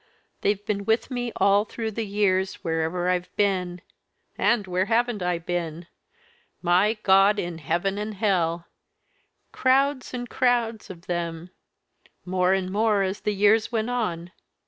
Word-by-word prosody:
They've 205 0 0
been 200 -1 -2
with 225 +5 +1
me 245 -1 -2
all 200 +1 +4
through 220 +1 -5
the 220 0 -4
years, 190 -2 0
wherever 165 +2 -1
I've 180 -1 0
been 185 -3 0 0.5
and 235 -4 +2
where 185 0 0
haven't 230 -1 0
I 180 -1 0
been? 170 -1 -4 0.8
My 185 +5 +3
God 195 +2 +5
in 175 -4 -4
heaven 175 +6 -1
and 210 0 -4
hell! 175 -5 0 0.9
crowds 270 +1 +1
and 245 -1 -5
crowds 240 -3 0
of 175 -2 -11
them, 170 0 -4 0.7
more 180 0 +1
and 190 -1 0
more 210 -1 +2
as 190 +1 -2
the 210 - -2
years 210 +3 +3
went 225 +1 -1
on. 180 -8 -2
195 Hz, 145 wpm, -25 LUFS, 180-220 Hz, 0.9 s, God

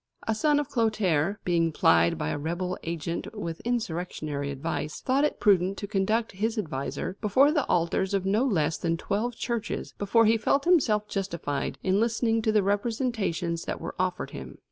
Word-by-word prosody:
A 225 - +2
son 295 +6 +2
of 295 - -2
Clotaire, 210 - +1
being 170 -2 +2
plied 85 - +4
by - - -2
a - - -2
rebel 175 +4 -2
agent 170 +5 -4
with 165 -5 -5
insurrectionary 170 -10 -3
advice, 140 +2 -4
thought 270 +2 +1
it 300 - 0
prudent 195 -2 +3
to - - -4
conduct 215 +3 0
his 220 +4 -2
adviser 160 +1 -3
before 260 +7 +4
the 300 -4 0
altars 180 +3 +1
of 190 -1 -1
no 205 +5 +2
less 165 - +1
than 165 -1 0
twelve 215 +7 -2
churches 235 -2 -3
before 225 +3 +3
he 225 +1 +4
felt 275 +5 +1
himself 225 -12 +3
justified 170 -9 -3
in 190 +1 +2
listening 225 0 +1
to 220 - +1
the 210 -2 +3
representations 200 -5 -1
that - - -3
were - - -5
offered 185 -1 -1
him. - - -8
200 Hz, 175 wpm, -27 LUFS, 170-225 Hz, -, plied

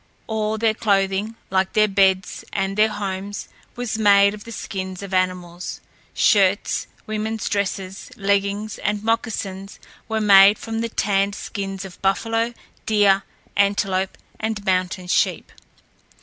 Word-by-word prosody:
All 220 -1 -1
their 220 0 +2
clothing, 200 0 0 0.2
like 190 0 +1
their 215 0 +4
beds 190 -2 +2
and 195 -1 -1
their 215 +1 +4
homes, 200 -1 -5 0.3
was 245 -3 -3
made 200 -1 +5
of 210 -1 -10
the 230 - -9
skins 190 -3 -5
of 195 -1 -7
animals. 180 -1 -2 0.4
Shirts, 200 -2 +3 0.2
women's 215 0 -3
dresses, 195 -1 -3
leggings, 200 +1 0
and 210 0 -1
moccasins 205 -4 -2 0.3
were 220 0 0
made 200 -1 +7
from 225 0 -4
the 230 - -2
tanned 200 -2 +1
skins 195 -2 -5
of 185 - -12
buffalo, 225 +4 0 0.3
deer, 205 -3 +4 0.3
antelope, 195 -2 +1 0.2
and 215 -2 -3
mountain 185 0 0
sheep. 180 - 0
200 Hz, 130 wpm, -22 LUFS, 195-215 Hz, 0.4 s, made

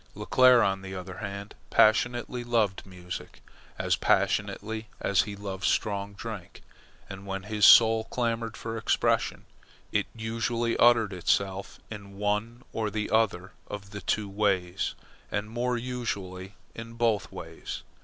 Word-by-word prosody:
Leclere, 130 -2 +5
on 95 -1 +1
the 95 0 -7
other 95 +1 -7
hand, 100 -1 -6 0.2
passionately 120 +2 +3
loved 110 -5 0
music 90 -1 -8 0.4
as - - +1
passionately 110 +1 0
as 100 -2 +3
he 100 - -5
loved 100 -2 -6
strong 100 -1 0
drink. 105 -4 -8 0.4
And 95 0 -9
when 95 0 -4
his 105 0 +4
soul 110 -1 +7
clamoured 115 -2 -2
for 115 0 -4
expression, - - +1 0.5
it - - +1
usually 115 +1 -1
uttered 115 -4 +5
itself 95 +2 -1
in 100 -2 -9
one 105 +4 -1
or 110 -2 -1
the 105 0 -3
other 105 -5 +1 0.2
of 100 -1 -7
the 105 -1 -6
two 105 -1 0
ways, 95 -2 0 0.3
and 105 +1 -3
more 120 +1 0
usually 100 -6 -4 0.2
in 115 0 -8
both 115 -3 0
ways. - - -7
105 Hz, 135 wpm, -28 LUFS, 100-115 Hz, 0.5 s, soul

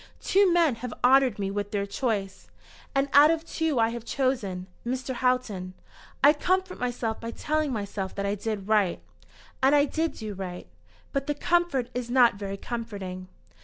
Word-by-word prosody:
Two 390 -1 +3
men 330 -8 +3
have 240 -1 -6
honoured 260 -2 +5
me 195 -1 -2
with 205 0 -3
their 200 -1 -1
choice, 200 -2 -3 0.5
and 275 +1 +2
out 290 +2 +8
of 325 -1 +1
the - - -21
two 320 -6 -1
I 225 0 +4
have 235 -1 -6
chosen 235 -9 -1 0.2
Mr. 260 +2 -3
Houghton. 235 -8 -1 0.5
I 290 +1 +8
comfort 370 +4 -1
myself 240 -2 -2
by 230 - -5
telling 305 +4 -1
myself 200 -4 -4
that 200 - -2
I 200 - 0
did 210 -1 -4
right; 210 -5 +2 0.6
and 270 +2 +5
I 285 0 +5
did 320 +1 -1
do 215 -2 -6
right. 185 -2 -6 0.5
But 275 -1 -1
the 295 - 0
comfort 325 -6 +1
is 245 -1 -4
not 245 -1 +5
very 200 -1 -5
comforting." 200 -6 -6
240 Hz, 175 wpm, -27 LUFS, 205-280 Hz, 0.6 s, out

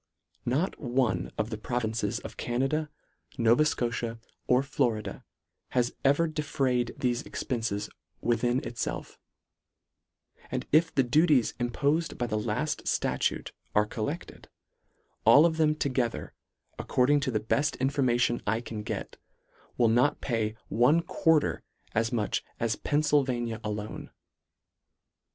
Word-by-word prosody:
Not 145 +10 0
one 120 - 0
of 110 +2 -1
the 110 - -4
provinces 110 -3 -1
of - - -8
Canada, 135 +6 -1 0.5
Nova 120 +4 +5
Scotia, 120 -4 -1 0.3
or 125 +2 +4
Florida, 120 -8 -1 0.5
has 120 -1 +2
ever 145 +5 +4
defrayed 135 -6 -1
thefe 125 +1 0
expences 115 -6 -3 0.3
within 120 +2 +1
itfelf: 120 - -4 1.3
And - - -3
if 165 +2 +4
the 135 - +3
duties 145 0 +3
im 120 0 0
pofed 150 +6 0
by 120 - -1
the 110 -2 -1
laft - - -2
ftatute - - 0 0.2
are 105 0 +5
collected, 130 +10 -5 0.7
all 150 +3 +8
of 160 -1 +1
them 155 -1 +3
together, 130 -5 -1 0.5
according 140 +3 +3
to 140 - -1
the 110 -4 0
beft 140 +8 0
in 135 +1 0
formation 120 -4 +2
I 110 +2 +2
can 115 -3 -6
get, - - -5 0.6
will 120 - +4
not 120 +6 +3
pay 110 -4 -1
one 145 +9 +3
quar 160 -2 +3
ter - - -3 0.3
as 115 +2 +1
much 110 -4 -1 0.2
as 115 -2 0
Pennfylvania 135 -6 +1
alone. 105 0 -5
125 Hz, 130 wpm, -28 LUFS, 115-145 Hz, 1.3 s, all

